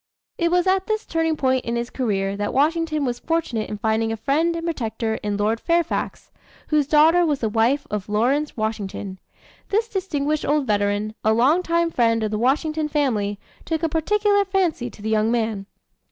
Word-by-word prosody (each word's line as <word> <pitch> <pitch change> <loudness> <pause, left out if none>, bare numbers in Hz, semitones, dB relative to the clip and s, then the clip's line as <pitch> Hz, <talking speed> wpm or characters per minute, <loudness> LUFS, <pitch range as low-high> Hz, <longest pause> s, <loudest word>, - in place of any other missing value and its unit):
It 340 -1 +2
was 355 +1 +2
at 380 0 +1
this 435 0 -1
turning 325 -1 0
point 260 -2 +1
in 235 - -2
his 235 +1 -3
career 200 -6 -1
that 205 0 -3
Washington 310 +1 +1
was 245 -1 -2
fortunate 310 -10 -2
in 210 - -4
finding 220 +1 0
a 225 - -3
friend 310 +9 +1
and 335 0 -4
protector 225 -8 -2
in 205 -1 -2
Lord 215 +2 0
Fairfax, 340 +3 -1 0.4
whose 300 -3 +2
daughter 320 +4 +5
was 295 -5 0
the 220 - 0
wife 235 +6 +1
of 210 -1 -3
Lawrence 255 +9 0
Washington. 205 -3 -4 0.5
This 440 +3 +1
distinguished 310 -8 -2
old 295 0 +1
veteran, 205 -1 0
a 220 - +3
long 270 +10 +3
time 335 -1 0
friend 230 -4 +2
of 215 - -1
the 215 - -1
Washington 305 +5 +1
family, 230 -9 0 0.3
took 320 0 -3
a 330 - +2
particular 405 +6 +2
fancy 365 -10 0
to 205 - -14
the 220 - -2
young 215 0 +2
man. 220 -4 -1
270 Hz, 185 wpm, -22 LUFS, 220-330 Hz, 0.5 s, daughter